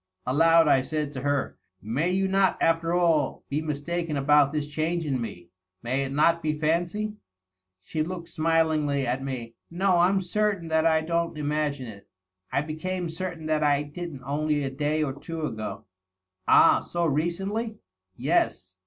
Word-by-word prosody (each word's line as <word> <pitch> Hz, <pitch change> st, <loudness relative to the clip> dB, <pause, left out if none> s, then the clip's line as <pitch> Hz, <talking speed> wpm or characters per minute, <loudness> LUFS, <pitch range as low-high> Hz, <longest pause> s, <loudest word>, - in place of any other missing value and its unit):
Aloud 165 Hz, +5 st, +5 dB
I 135 Hz, -3 st, +5 dB
said 150 Hz, +1 st, -3 dB
to 130 Hz, -, -5 dB
her, 145 Hz, 0 st, -1 dB
" 95 Hz, 0 st, -54 dB, 0.2 s
May 170 Hz, +3 st, +2 dB
you 190 Hz, +1 st, +1 dB
not, 195 Hz, 0 st, +2 dB
after 165 Hz, 0 st, +2 dB
all, 170 Hz, -3 st, +2 dB
be 145 Hz, +2 st, -1 dB
mistaken 155 Hz, +1 st, -3 dB
about 140 Hz, 0 st, +4 dB
this 150 Hz, -1 st, -2 dB
change 160 Hz, +3 st, -2 dB
in 135 Hz, -4 st, -1 dB
me? 90 Hz, -7 st, -7 dB, 0.3 s
May 130 Hz, +3 st, 0 dB
it 135 Hz, -, -5 dB
not 165 Hz, +4 st, +3 dB
be 155 Hz, -1 st, -1 dB
fancy 175 Hz, +7 st, -1 dB, 0.3 s
?" 95 Hz, 0 st, -59 dB
She 155 Hz, -, -3 dB
looked 170 Hz, +1 st, -4 dB
smilingly 155 Hz, -3 st, +1 dB
at 125 Hz, +2 st, -1 dB
me. 125 Hz, -4 st, -5 dB, 0.2 s
"No; 185 Hz, +1 st, +2 dB
I'm 190 Hz, +3 st, +4 dB
certain 195 Hz, -2 st, -1 dB
that 160 Hz, 0 st, +3 dB
I 160 Hz, -1 st, +3 dB
don't 170 Hz, 0 st, -1 dB
imagine 150 Hz, -2 st, -1 dB
it. 105 Hz, -4 st, -11 dB, 0.4 s
I 140 Hz, -, +1 dB
became 175 Hz, +3 st, -3 dB
certain 170 Hz, -1 st, -5 dB
that 155 Hz, -1 st, +1 dB
I 145 Hz, -1 st, +3 dB
didn't 150 Hz, -2 st, -7 dB
only 150 Hz, +1 st, 0 dB
a 135 Hz, -, -2 dB
day 150 Hz, +3 st, 0 dB
or 135 Hz, -3 st, -2 dB
two 160 Hz, +3 st, -5 dB
ago." 110 Hz, -3 st, -5 dB, 0.6 s
"Ah? -, -, +6 dB
So 175 Hz, 0 st, -2 dB
recently?" 195 Hz, +9 st, -1 dB, 0.2 s
" 95 Hz, 0 st, -57 dB
Yes. 120 Hz, -, 0 dB
155 Hz, 170 wpm, -26 LUFS, 140-170 Hz, 0.6 s, Ah